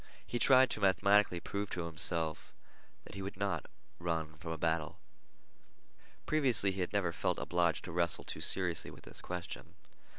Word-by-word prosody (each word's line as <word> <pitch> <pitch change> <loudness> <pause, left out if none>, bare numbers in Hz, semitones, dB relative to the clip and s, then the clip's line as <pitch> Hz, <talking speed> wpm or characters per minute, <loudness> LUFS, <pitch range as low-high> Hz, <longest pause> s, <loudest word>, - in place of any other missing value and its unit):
He 120 - -3
tried 130 +1 +6
to - - -2
mathematically 100 -1 +3
prove 100 +3 -4
to 90 -2 -3
himself 80 -1 -3 0.5
that - - -12
he 100 - -6
would 95 0 -6
not 100 0 -2 0.3
run 80 -3 -2
from 80 - -7
a 80 - -3
battle. 80 -1 -1 1.3
Previously 125 -10 +2
he 95 0 -4
had 90 - -2
never 100 -4 0
felt - - -1
obliged 85 -2 0
to 90 - -6
wrestle 85 0 +4
too - - -6
seriously 90 -3 +1
with - - -14
this - - -9
question. 90 -1 -7
90 Hz, 165 wpm, -33 LUFS, 85-100 Hz, 1.3 s, tried